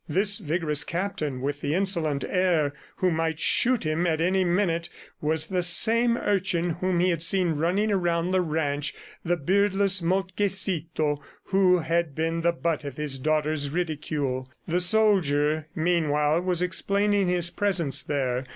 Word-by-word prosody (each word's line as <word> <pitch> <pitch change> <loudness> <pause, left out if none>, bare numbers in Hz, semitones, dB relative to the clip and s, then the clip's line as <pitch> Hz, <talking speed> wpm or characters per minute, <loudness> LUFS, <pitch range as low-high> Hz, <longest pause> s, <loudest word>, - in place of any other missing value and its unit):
This 200 +6 +1
vigorous 155 -4 0
captain 165 -8 -3
with 145 +2 -3
the 145 +2 -1
insolent 170 -7 0
air 175 -6 +1 0.2
who 185 -1 +1
might 160 -1 -1
shoot 245 +6 +2
him 155 +3 0
at 160 -2 0
any 185 +3 +2
minute 175 -2 0 0.3
was 155 +1 0
the 180 +1 -1
same 230 +8 +2
urchin 185 -5 0
whom 180 +1 -1
he 180 +1 +3
had 165 -2 -2
seen 180 +1 +2
running 180 +8 0
around 175 -2 0
the 185 0 +2
ranch, 150 -3 -2 0.3
the 175 +1 0
beardless 195 +3 +2
Moltkecito 175 -4 0 0.2
who 190 -2 +3
had 165 -2 -1
been 165 +1 -1
the 170 +1 +3
butt 165 -2 -2
of 140 -3 -7
his 145 -3 -3
daughter's 155 0 0
ridicule.... 145 -5 -3 0.2
The 175 +1 +1
soldier, 160 -7 +2
meanwhile, 155 -2 +1
was 180 -1 0
explaining 200 +2 +1
his 175 -1 0
presence 175 -7 0
there. 130 -3 -2
170 Hz, 150 wpm, -25 LUFS, 155-185 Hz, 0.3 s, he